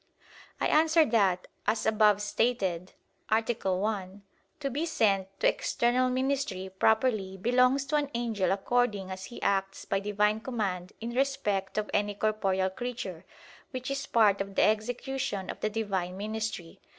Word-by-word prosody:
I - - 0
answer 320 +1 +4
that, 195 -7 +2 0.2
As 225 - +1
above 210 -2 +4
stated 195 -5 0 0.4
(A. 220 +1 +3 0.3
1), 200 0 -3 0.4
to 280 -2 -2
be 290 +6 -1
sent 200 - +2
to - - +3
external 250 +2 +2
ministry 255 -7 -1
properly 215 -1 +1
belongs 250 +6 +3
to 300 +2 +1
an 290 -1 -1
angel 225 -5 0
according 200 -1 0
as 190 0 -6
he 240 - -9
acts 195 0 0
by 195 - 0
Divine 210 +1 +1
command 200 -7 -3
in 230 +1 -4
respect 215 -8 -1
of 210 -1 -1
any 205 0 +1
corporeal 195 -3 0
creature; 200 -7 -5 0.4
which 255 +1 -5
is 275 0 -3
part 210 -4 +4
of 195 0 -5
the - - +4
execution 220 -1 -1
of - - -11
the 215 - 0
Divine 195 -4 -2
ministry. 215 -4 -4
215 Hz, 150 wpm, -29 LUFS, 195-245 Hz, 0.4 s, answer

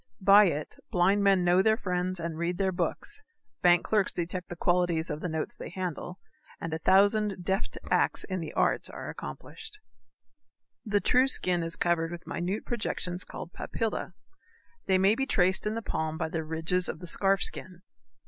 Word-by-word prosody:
By 200 +1 +7
it 150 -4 -2
blind 190 +3 +3
men 195 -2 +4
know 175 +1 +4
their 220 +2 +3
friends 180 -3 -2
and 165 -1 -4
read 170 +2 -2
their 190 -1 +1
books, 185 - -3 0.4
bank 175 -1 +5
clerks 210 -3 +2
detect 180 +1 -4
the 175 - -6
qualities 175 -2 +1
of 150 - -4
the 180 - -3
notes 160 -1 -3
they - - -8
handle, 180 0 -5 0.4
and 165 -1 -5
a 160 - -2
thousand 200 +1 +3
deft 190 +1 -1
acts - - +3
in 185 -1 -4
the 160 - -5
arts - - +1
are - - -7
accomplished. 445 -2 -8 1.1
The 205 -2 +1
true 255 +1 +4
skin 180 -9 +3
is 165 0 -3
covered 170 -1 +1
with 175 0 -8
minute 185 +5 -3
projections 185 -6 -2
called 175 -2 -9
papillæ. 225 -1 -3 0.7
They 190 - +4
may 195 +2 +4
be 270 +4 -1
traced 185 +2 +2
in 215 - -1
the 230 - -4
palm 160 -4 -2
by 160 -1 -2
the 160 0 -3
ridges 160 +3 -1
of - - -4
the 180 - -9
scarf 195 +3 +1
skin. 185 -1 -2
180 Hz, 180 wpm, -28 LUFS, 170-200 Hz, 1.1 s, By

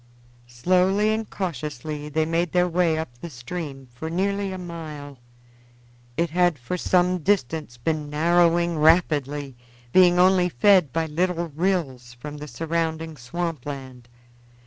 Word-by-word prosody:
Slowly 185 - +2
and 220 0 -3
cautiously 150 -3 -5
they 155 +1 +1
made 165 +1 -1
their 180 0 +3
way 170 -2 +1
up 120 -7 -6
the 170 - -7
stream 135 +1 -7
for 160 +6 -6
nearly 200 +3 -1
a 185 - -5
mile. 155 -6 -8 1.0
It 170 -2 0
had 175 -2 +2
for 125 +7 -4
some 180 0 +2
distance 160 -7 -1
been 150 +4 -2
narrowing 170 +2 +2
rapidly, 145 -4 +2 0.4
being 180 -1 +6
only 180 0 +4
fed 180 +1 +4
by 165 +3 0
little 170 +2 -1
rills 145 -7 -2
from 145 +5 -8
the 150 +1 -8
surrounding 160 0 -2
swamp 150 +2 -4
land. 130 -4 -8
165 Hz, 135 wpm, -24 LUFS, 145-180 Hz, 1.0 s, being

